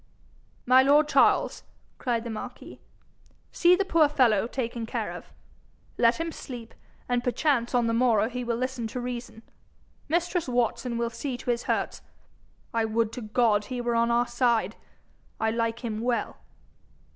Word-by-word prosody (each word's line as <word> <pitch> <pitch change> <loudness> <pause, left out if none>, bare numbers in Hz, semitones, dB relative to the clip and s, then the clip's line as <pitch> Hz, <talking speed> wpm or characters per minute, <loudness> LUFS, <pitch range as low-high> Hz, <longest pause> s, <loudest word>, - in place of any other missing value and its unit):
'My 255 +1 +6
lord 290 +3 +4
Charles,' - - +3 0.4
cried 235 -3 -1
the 235 - -5
marquis, 215 - -8 0.7
'see 355 0 +5
the 395 +2 0
poor 325 -5 +4
fellow 230 -7 +3
taken 235 -2 -4
care - - -3
of. - - -9 0.7
Let 235 +4 +3
him 330 0 -2
sleep, 245 -7 -9 0.3
and 245 -1 0
perchance 250 -1 +1
on 240 -1 +3
the 230 - 0
morrow 230 -3 +3
he 250 +1 -4
will 235 -1 -1
listen 255 -2 -3
to 250 - -5
reason. 240 -2 -6 0.7
Mistress 345 -1 0
Watson 245 0 0
will 235 0 -1
see 245 +2 -4
to 245 - -2
his 235 0 -3
hurts. - - -1 0.7
I 230 -1 +1
would 220 0 0
to 250 - -7
God 215 -1 +2
he 250 +2 -5
were 240 0 -1
on 230 0 +2
our 235 +1 +3
side! 235 -4 +1 0.6
I 220 0 +1
like 230 +1 -2
him 220 -1 -3
well.' 240 0 -1
240 Hz, 160 wpm, -27 LUFS, 230-255 Hz, 0.7 s, My